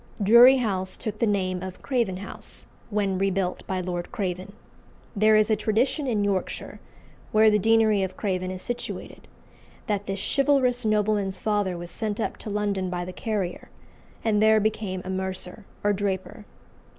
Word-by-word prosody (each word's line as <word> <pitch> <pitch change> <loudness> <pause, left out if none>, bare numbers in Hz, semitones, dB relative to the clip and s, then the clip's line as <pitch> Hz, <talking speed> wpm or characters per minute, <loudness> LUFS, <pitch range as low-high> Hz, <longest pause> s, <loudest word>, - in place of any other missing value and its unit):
Drury 235 +6 +8
House 190 -6 -1
took 215 -1 -5
the 230 - +2
name 185 -3 0
of 185 0 -8
Craven 235 -9 0
House 200 - -7 0.2
when 200 -3 0
rebuilt 195 -2 0
by 185 -1 -1
Lord 175 -1 -4
Craven. 185 0 -4 0.6
There 215 +1 +5
is 215 +1 +4
a - - +5
tradition 230 +7 0
in 215 -5 +1
Yorkshire, 195 -2 -2 0.5
where 215 0 +6
the 210 - +3
deanery 220 -1 +4
of 190 -1 -3
Craven 185 -3 -1
is 185 0 -5
situated, 245 0 -6 0.6
that 205 -1 -2
this 195 0 -3 0.2
chivalrous 265 -4 +3
nobleman's 210 -2 +1
father 205 -3 0
was 175 0 -7
sent 215 -2 -2
up - - -2
to - - -8
London 200 -2 -1
by 175 -1 -3
the 185 - -7
carrier, 200 -4 -3 0.5
and 210 -2 +2
there 220 0 +6
became 205 -3 -2
a - - -5
mercer 190 +1 -4 0.2
or 205 0 +3
draper. 200 +1 -3
205 Hz, 165 wpm, -25 LUFS, 185-220 Hz, 0.6 s, Drury